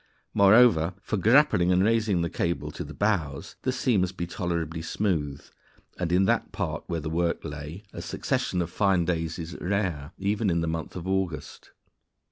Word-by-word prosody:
Moreover, 100 -5 +5
for 105 - -3
grappling 110 -4 +4
and 90 +1 +4
raising 110 -5 +2
the 85 - -1
cable 85 0 -2
to - - -6
the - - -10
bows, 90 -5 -1
the 130 - 0
sea 125 -3 +1
must 95 +1 -1
be 85 - -2
tolerably 85 -2 -3
smooth; 80 -6 -2 0.5
and 85 -2 -1
in 95 +2 +4
that - - +1
part - - -3
where 85 -2 -2
the 80 - -5
work 85 +1 -1
lay 75 +6 -7
a - - -6
succession 90 -1 -1
of 85 - -7
fine 95 -4 +2
days 80 -2 -1
is 85 -1 -6
rare, 90 -6 -1
even 100 +2 0
in 85 -1 +1
the 85 - -1
month 80 -1 -4
of 90 0 -6
August. 95 -4 -3
90 Hz, 180 wpm, -27 LUFS, 80-100 Hz, 0.5 s, Moreover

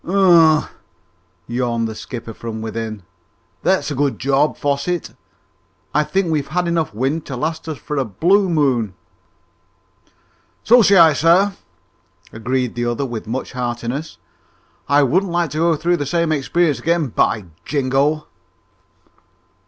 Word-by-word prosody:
"Humph!" 170 -4 +4 0.7
yawned 120 -1 -1
the 110 - -5
skipper 115 0 -8
from 110 0 -6
within. 110 -2 -5 0.6
"That's 190 -4 +1
a - - -3
good 140 0 0
job, 140 +3 +1
Fosset. 145 +4 -2 0.8
I 150 - +3
think 190 +1 -1
we've 150 -3 -1
had 175 +3 -1
enough 170 -2 0
wind 135 +9 -2
to 135 - -5
last 160 +3 -3
us 155 - -4
for 150 +5 -5
a 135 - +2
blue 180 - +2
moon!" 130 - +1 1.7
"So 245 +2 +6
say 200 -2 +5
I, 165 -3 +7
sir," 175 +7 +3 0.8
agreed 125 +2 -2
the 120 0 -2
other 120 +4 -1
with 120 -4 -6
much 125 +4 -4
heartiness. 125 +4 -4 0.7
"I 145 0 +5
wouldn't 180 +8 +1
like 170 -3 0
to 155 - -3
go 165 0 +3
through 175 +3 0
the 145 - -3
same 170 0 0
experiences 155 +1 +1
again, 165 -4 0
by 105 -2 0 0.2
Jingo!" 145 +2 0
145 Hz, 140 wpm, -19 LUFS, 125-170 Hz, 1.7 s, I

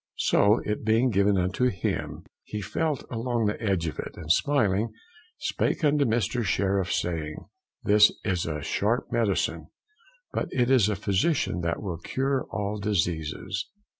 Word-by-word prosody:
so 105 +3 +4
it 105 +1 -2
being 115 +3 +3
given 100 0 +3
unto 95 +7 +1
him, 95 -9 -2 0.2
he 105 - -5
felt 150 - -2
along 120 0 -1
upon - - +1
the 105 +2 -1
edge 95 -5 +1
of 80 - -4
it, - - -6
and 80 -2 -2
smiling, 110 -2 +2 0.5
spake - - -1
unto 145 -1 +3
Mr. 120 +1 0
Sheriff, 95 -1 0
saying, 80 -3 -2 0.5
this 105 0 +6
is 90 -5 0
a 75 -2 -3
sharp 110 +10 0
medicine, 115 -4 0 0.7
but - - -1
it 125 0 +1
is 120 -6 +5
a 105 - 0
physician 100 - 0
that 85 +3 -2
will 90 -5 -4
cure 135 +6 -1
all 105 +1 -3
diseases. 90 -1 -2
105 Hz, 155 wpm, -27 LUFS, 95-120 Hz, 0.7 s, this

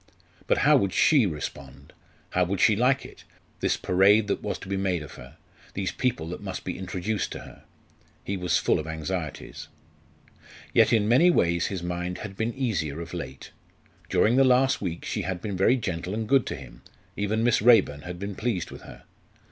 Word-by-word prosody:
But - - +3
how - - +7
would 100 -2 0
she 140 -9 +4
respond? 70 -4 -7 0.4
How 90 - +2
would 95 +2 -2
she 110 - +5
like 125 +5 +2
it - - -13 0.4
this - - +1
parade 100 +4 +4
that - - -1
was - - -3
to - - -11
be 100 - -2
made 95 -4 -1
of 75 - -11
her - - -13 0.4
these 95 -2 -2
people 115 -11 -2
that 90 - -6
must 95 -2 -6
be 90 - -4
introduced 95 +3 -3
to - - -7
her? - - -14 0.6
He 100 - -3
was 90 -3 +1
full - - +1
of 80 - -6
anxieties. 80 0 -5 1.1
Yet - - +5
in 110 -3 +3
many 130 +10 +5
ways 85 - +2
his 95 -3 -4
mind 90 +1 -3
had 100 -2 -8
been 110 +3 -2
easier 85 - -2
of 85 +1 -8
late. 65 -7 -7 0.6
During 115 +4 +3
the 135 - +6
last 130 +1 +3
week 85 -4 -4
she 105 - -2
had 90 -1 -3
been 100 +1 -4
very 95 +7 +4
gentle 90 -4 -3
and 110 0 -3
good 135 +1 +3
to - - -3
him 65 -4 -12 0.3
even 105 +2 -1
Miss 120 -3 +3
Raeburn 110 -11 +5
had 90 +2 -7
been 100 +2 -5
pleased 100 -5 -2
with - - -10
her. - - -13
95 Hz, 195 wpm, -26 LUFS, 85-110 Hz, 1.1 s, how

